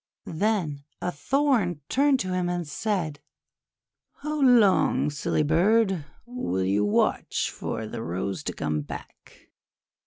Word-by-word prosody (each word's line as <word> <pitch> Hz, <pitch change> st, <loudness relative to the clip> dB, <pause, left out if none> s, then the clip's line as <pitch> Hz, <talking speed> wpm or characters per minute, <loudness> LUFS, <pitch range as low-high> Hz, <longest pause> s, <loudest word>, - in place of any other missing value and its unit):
Then 165 Hz, -6 st, -1 dB, 0.2 s
a 180 Hz, -, -2 dB
Thorn 210 Hz, -, +1 dB
turned 275 Hz, 0 st, +3 dB
to 185 Hz, -1 st, -2 dB
him, 180 Hz, -1 st, 0 dB
and 175 Hz, -2 st, -2 dB
said: 170 Hz, -4 st, -2 dB, 0.5 s
— -, -, -64 dB
"How 305 Hz, 0 st, -2 dB
long, 225 Hz, -, +4 dB
silly 150 Hz, +1 st, 0 dB
bird, 185 Hz, +2 st, +2 dB, 0.2 s
will 240 Hz, -, -2 dB
you 100 Hz, +2 st, +2 dB
watch 105 Hz, -, +1 dB
for 110 Hz, -, -4 dB
the 115 Hz, +1 st, -6 dB
Rose 95 Hz, 0 st, -3 dB
to -, -, -2 dB
come 75 Hz, -1 st, -2 dB
back? 70 Hz, -, -11 dB
175 Hz, 130 wpm, -26 LUFS, 140-225 Hz, 0.5 s, long